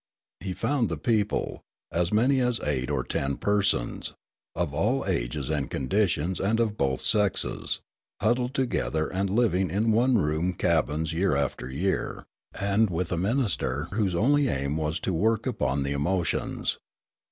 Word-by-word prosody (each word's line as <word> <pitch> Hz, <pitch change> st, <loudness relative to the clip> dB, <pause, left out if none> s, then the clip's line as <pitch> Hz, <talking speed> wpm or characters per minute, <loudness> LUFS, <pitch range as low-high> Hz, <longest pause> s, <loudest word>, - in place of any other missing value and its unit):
He 95 Hz, -2 st, -4 dB
found 120 Hz, +4 st, 0 dB
the 80 Hz, -, -2 dB
people, 105 Hz, +4 st, 0 dB, 0.3 s
as 85 Hz, +1 st, 0 dB
many 125 Hz, +6 st, +3 dB
as 125 Hz, -2 st, +1 dB
eight 65 Hz, -3 st, -1 dB
or -, -, 0 dB
ten 70 Hz, 0 st, -1 dB
persons, 100 Hz, -1 st, 0 dB, 0.4 s
of 85 Hz, -4 st, -1 dB
all 110 Hz, -, +1 dB
ages -, -, -1 dB
and 70 Hz, -4 st, -1 dB
conditions 90 Hz, +3 st, 0 dB
and 110 Hz, +4 st, +1 dB
of 110 Hz, -3 st, +1 dB
both 65 Hz, -7 st, 0 dB
sexes, 105 Hz, -3 st, +1 dB, 0.4 s
huddled 125 Hz, +4 st, +1 dB
together 80 Hz, -, 0 dB
and 95 Hz, +1 st, 0 dB
living 95 Hz, -4 st, +2 dB
in 105 Hz, +6 st, +1 dB
one 120 Hz, +3 st, +4 dB
room 80 Hz, +1 st, 0 dB
cabins 80 Hz, -2 st, 0 dB
year 90 Hz, -1 st, +2 dB
after 70 Hz, -2 st, -2 dB
year, 90 Hz, +9 st, -2 dB, 0.3 s
and 100 Hz, +2 st, +2 dB
with 85 Hz, 0 st, -2 dB
a -, -, +1 dB
minister 85 Hz, -, 0 dB
whose 100 Hz, -3 st, 0 dB
only 140 Hz, +9 st, +3 dB
aim 70 Hz, -, -1 dB
was 80 Hz, +1 st, -1 dB
to 95 Hz, -, -1 dB
work 110 Hz, +6 st, +1 dB
upon 70 Hz, -, 0 dB
the 70 Hz, -, -2 dB
emotions. 85 Hz, +5 st, -1 dB
95 Hz, 150 wpm, -27 LUFS, 75-110 Hz, 0.4 s, one